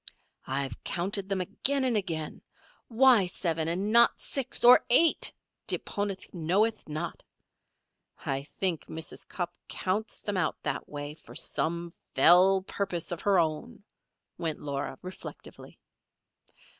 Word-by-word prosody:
"I've 135 -3 -3
counted 195 +3 -2
them 195 -2 0
again 265 +9 0
and 250 -3 +1
again. 165 -7 -3 0.5
Why 240 -4 +5
seven, 165 -3 -1
and 190 +5 -1
not 235 +1 +5
six, 270 -2 -1
or 245 +1 +8
eight, 325 +7 +4 0.4
deponent 200 -2 -3
knoweth 195 +5 0
not. 155 +3 -4 1.0
I 135 0 -1
think 165 +3 -2
Mrs. 160 0 -5
Cupp 175 -1 -4
counts 205 +4 -1
them 205 -2 -2
out 170 -4 0
that - - -3
way 145 0 -5
for 155 - -15
some 170 +1 -1 0.2
fell 185 +2 +6
purpose 185 -4 -3
of 175 - -4
her 200 -2 +3
own," 175 +8 -1 0.6
went 160 -3 -2
on - - -13
Laura, 140 -1 -3
reflectively. 185 +1 -10
185 Hz, 130 wpm, -29 LUFS, 160-205 Hz, 1.0 s, or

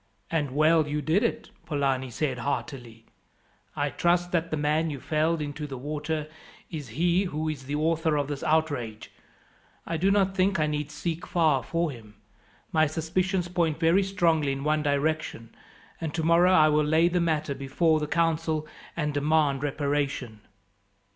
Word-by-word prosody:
"And 145 -5 -1
well 155 +1 +4
you 150 +1 -1
did 155 +7 +1
it," 230 -1 -2 0.2
Polani 135 -3 0
said 130 +1 -2
heartily. 120 -4 -4 0.7
"I - - -1
trust 175 0 +1
that 165 -1 0
the 155 - -2
man 150 +2 +1
you 140 -3 -5
felled 155 +3 0
into 150 +1 -5
the 135 -2 -6
water 150 +3 -3 0.4
is 150 -5 -5
he 175 +3 +2
who 155 -3 -3
is 145 -4 -4
the 145 - -2
author 160 0 +1
of 145 -1 -1
this 145 -2 -4
outrage. 145 -9 -1 0.7
I 165 - -2
do 185 +5 +2
not 195 -1 +2
think 190 -1 +1
I 155 - +3
need 150 -1 -2
seek 160 +3 -4
far 155 -6 +2
for 165 +1 -1
him. 110 -4 -13 0.6
My 155 -1 +3
suspicions 175 +4 -1
point 170 -3 0
very 165 +4 +4
strongly 165 -7 +1
in 135 0 -5
one 155 +1 +1
direction, 145 -5 -1 0.5
and 160 -2 -2
tomorrow 170 +2 +4
I 155 -4 +6
will 150 0 +3
lay 160 +3 +3
the 175 0 +1
matter 155 -3 0
before 145 +4 +1
the 150 - -3
council 160 -1 0 0.3
and 150 -2 -1
demand 145 -1 +2
reparation." 140 -6 -2
155 Hz, 165 wpm, -27 LUFS, 145-165 Hz, 0.7 s, I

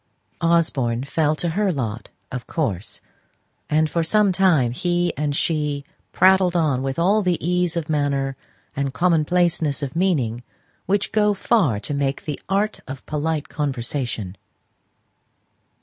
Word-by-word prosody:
Osborne 145 -8 +1
fell 150 +2 +1
to 170 +2 -2
her 195 +3 +1
lot, 120 -7 -4 0.2
of 125 -1 -5
course, 105 - -3 0.7
and 155 +1 +3
for 170 +2 -1
some 205 +4 +3
time 175 -10 +3
he 175 +6 0
and 145 -1 -1
she 150 -3 0 0.3
prattled 185 -1 +4
on 150 -7 +2
with 135 0 -3
all 195 +6 +3
the 180 -3 +1
ease 180 0 0
of 160 -2 -2
manner 140 -3 0 0.4
and 140 -1 -2
commonplaceness 165 -2 +1
of 140 +1 -4
meaning 140 -11 +1 0.5
which 200 +1 +1
go 210 -1 +3
far 185 - +2
to 110 - -5
make 140 -1 -1
the 150 -2 -4
"art 205 +2 0
of 135 0 -8
polite 155 0 -2
conversation." 125 - -3
155 Hz, 135 wpm, -22 LUFS, 135-175 Hz, 0.7 s, prattled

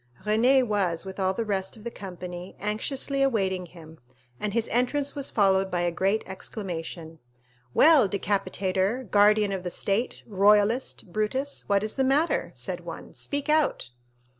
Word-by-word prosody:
Renée 245 +5 +4
was, 195 -6 -1
with 190 +1 -8
all 190 0 +1
the 230 - -2
rest 195 0 -2
of 215 - -14
the 235 - -5
company, 180 -2 -8
anxiously 265 +7 -1
awaiting 190 -9 +1
him, 160 -2 -14 0.4
and 210 - -2
his 230 +1 0
entrance 275 +4 0
was 280 -1 -2
followed 195 -2 +2
by 175 -1 -1
a 175 0 +1
general 195 +5 +1
exclamation. 170 -4 -6 0.6
"Well, 300 -9 +6
Decapitator, 195 +3 -1
Guardian 210 -1 +4
of 190 -2 -2
the 180 - -4
State, 200 +6 -2
Royalist, 210 0 +2
Brutus, 260 +7 -2
what 200 0 +3
is 215 +4 -2
the 265 - +3
matter?" 280 +5 +2
said - - -3
one. - - -9
"Speak 285 -1 -4
out." 300 - +1
205 Hz, 155 wpm, -26 LUFS, 190-240 Hz, 0.6 s, Well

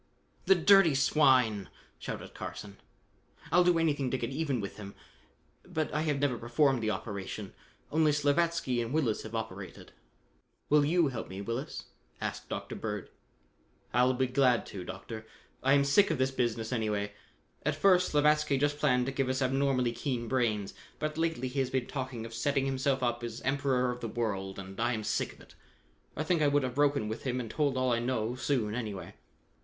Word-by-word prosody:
"The 195 - +6
dirty 180 -3 +6
swine!" 130 -7 +3 0.3
shouted - - -6
Carson. 100 -1 -7 0.7
"I'll 180 - +6
do 175 -1 +4
anything 145 -5 +1
to 130 - 0
get 120 0 -3
even 140 -3 -1
with 100 -2 -6
him, 100 -1 -9 0.7
but 155 -1 -3
I 150 - +1
have 150 -3 0
never 135 -4 0
performed 130 +2 +2
the 110 - 0
operation. 100 -1 -5 0.4
Only 155 0 +4
Slavatsky 145 -3 +1
and 115 0 -4
Willis 135 -9 +1
have 110 +1 -7
operated." 100 -5 -6 0.8
"Will 150 0 +5
you 165 0 +3
help 120 -4 -5
me, 95 +1 -7
Willis? 115 +7 -4 0.4
asked - - -5
Dr. - - -5
Bird. - - -5 0.8
"I'll 125 +2 +4
be 130 +1 +2
glad 125 -2 +3
to, 95 -3 -5
Doctor. 110 +4 -8 0.3
I 135 +1 +4
am 140 -1 +5
sick 140 +9 +4
of 160 - 0
this 130 +1 +1
business 120 -3 -1
anyway. 105 -3 -1 0.5
At - - 0
first, 185 -2 +4
Slavatsky 150 -1 +3
just 145 +1 0
planned 125 -4 +3
to 135 - -2
give 135 -1 -1
us 130 0 0
abnormally 130 -2 +1
keen 120 -2 -3
brains, 110 -6 0 0.2
but 155 0 -3
lately 160 -5 -1
he 130 +2 -3
has 130 -2 +1
been 130 -2 -1
talking 130 -4 -5
of 115 - -9
setting 135 +4 0
himself 135 0 0
up 120 -1 0
as 115 -1 -5
Emperor 135 -2 +1
of 125 - -6
the 115 - -3
World, 100 -5 -3
and 95 +1 -8
I 120 +2 +1
am 110 -2 -3
sick 110 - -1
of - - -18
it. - - -17 0.6
I 155 - 0
think 165 0 +1
I 150 - +4
would 145 0 +3
have 130 -1 -2
broken 140 -4 +2
with 110 +2 -4
him 125 -1 -2
and 115 -3 -5
told 140 -2 0
all 130 -1 +2
I 115 - +1
know, 120 -2 -1
soon, 120 -4 -1
anyway." 105 -5 -5
130 Hz, 190 wpm, -30 LUFS, 115-145 Hz, 0.8 s, The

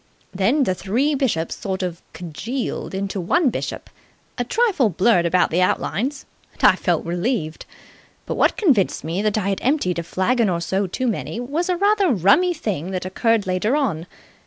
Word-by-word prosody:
Then 225 +10 +2
the 185 - +1
three 235 +11 0
bishops 240 - -1
sort 190 -2 -4
of 175 -2 -4
congealed 185 - -5
into 195 0 -3
one 280 - +2
bishop, - - -5 0.5
a 245 - -1
trifle 380 - +2
blurred 180 -1 +3
about 180 +1 +2
the 175 +3 +2
outlines, 235 - -1 0.3
and - - -14
I - - +7
felt - - -1
relieved. 175 -1 -2 0.6
But - - -3
what - - +2
convinced 270 - +2
me 165 +5 -2
that 215 0 0
I 200 -2 0
had 195 - -2
emptied 250 - 0
a - - -3
flagon 215 +6 +1
or 170 -2 0
so 190 +3 -1
too 255 +8 -3
many 230 -1 -2
was 295 +9 -2
a 360 - +1
rather 400 0 +3
rummy 215 - +4
thing 190 - -3
that 185 -1 -4
occurred 225 +3 +1
later 185 +7 0
on. 195 - -1
200 Hz, 180 wpm, -21 LUFS, 180-265 Hz, 0.6 s, I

